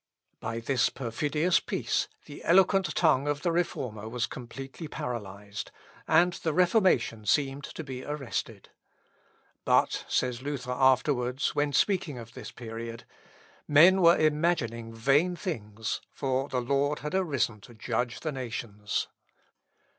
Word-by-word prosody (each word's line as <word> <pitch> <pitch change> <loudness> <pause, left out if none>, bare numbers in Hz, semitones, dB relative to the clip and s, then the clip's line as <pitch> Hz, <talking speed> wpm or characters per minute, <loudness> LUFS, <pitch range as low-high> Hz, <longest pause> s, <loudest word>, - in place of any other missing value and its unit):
By 115 +1 -4
this 125 +2 +2
perfidious 150 +7 0
peace - - -1 0.2
the 145 - -10
eloquent 190 +2 +4
tongue 145 -4 +3
of 145 0 -1
the 175 - +2
Reformer 125 -11 -2
was 120 +1 -1
completely 135 +5 -8
paralysed; 105 -6 -6 0.4
and 175 +1 +4
the 160 -2 -2
Reformation 180 - +3
seemed 140 +2 +1
to 160 - -7
be 130 -3 -6
arrested. 145 -3 -5 0.9
"But," - - +2
says 125 -1 0
Luther 135 -2 -4
afterwards, 130 0 +2
when 145 0 +1
speaking 170 -1 +1
of 115 -1 -10
this 125 -4 -8
period, 115 -1 -7 0.6
"men 175 +6 +7
were 170 0 +7
imagining 150 -8 +1
vain 140 +10 +2
things, 110 - -4
for 135 +1 -1
the 125 - -1
Lord 140 +3 0
had 150 - -3
arisen 140 - 0
to 120 - -14
judge 120 +2 -2
the 155 - -2
nations." 115 -6 -3
135 Hz, 130 wpm, -28 LUFS, 115-155 Hz, 0.9 s, men